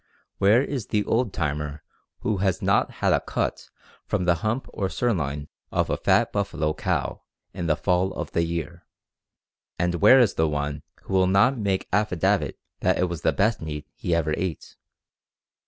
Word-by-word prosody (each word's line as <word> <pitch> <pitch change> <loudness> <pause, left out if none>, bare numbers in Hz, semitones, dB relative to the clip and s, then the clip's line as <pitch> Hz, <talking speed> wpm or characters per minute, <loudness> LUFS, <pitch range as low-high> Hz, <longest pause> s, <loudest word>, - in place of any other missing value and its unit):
Where 105 +6 +5
is 135 -8 -4
the 105 -1 +1
'old 115 0 0
timer' 75 -2 -3 0.4
who 105 - 0
has 95 -3 +1
not - - +2 0.2
had - - +5
a - - +3
cut - - -3 0.3
from 90 - -1
the 90 - +5
hump 115 +5 -1
or 95 -3 -1
sirloin 75 - -1 0.2
of - - 0
a - - +2
fat - - +2
buffalo 80 -6 -1
cow - - -2 0.3
in 85 -2 -3
the 80 - +3
fall 90 +2 +1
of 85 -4 -5
the 85 - +1
year, 85 +1 -4 0.9
and 90 0 0
where 130 - +8
is 120 -5 +4
the 80 - +2
one 75 -1 -2 0.2
who - - -6
will 95 -1 +4
not 100 +8 +4
make 100 -5 -1
affidavit 100 -4 +1 0.2
that - - +2
it 90 0 +1
was 85 -4 -5
the - - +3
best 110 +3 +1
meat 75 -2 -5
he 85 - -1
ever 80 -2 0
ate? 90 -3 -4
90 Hz, 175 wpm, -25 LUFS, 80-105 Hz, 0.9 s, where